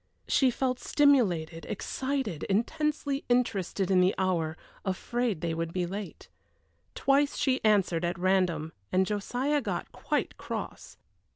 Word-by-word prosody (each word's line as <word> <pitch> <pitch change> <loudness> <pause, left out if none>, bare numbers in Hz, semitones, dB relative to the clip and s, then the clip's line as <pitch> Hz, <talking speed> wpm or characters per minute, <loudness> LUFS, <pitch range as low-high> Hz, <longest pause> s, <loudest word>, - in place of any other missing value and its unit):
She 265 - +4
felt 255 0 -1
stimulated, 185 - +2
excited, 260 - -2
intensely 280 +6 0
interested 200 -6 +1
in 185 -1 +5
the 185 +2 +3
hour, 170 -4 0 0.3
afraid 215 +1 -1
they 170 -1 -1
would 165 0 -2
be 180 0 -1
late. 200 +3 -7 0.7
Twice 280 +1 +2
she 265 -2 +1
answered 195 -6 +3
at 175 +2 -1
random, 175 -4 +1 0.2
and 190 +1 +3
Josiah 250 +8 0
got 195 -7 -3
quite - - -2
cross. - - -6
195 Hz, 125 wpm, -29 LUFS, 175-255 Hz, 0.7 s, in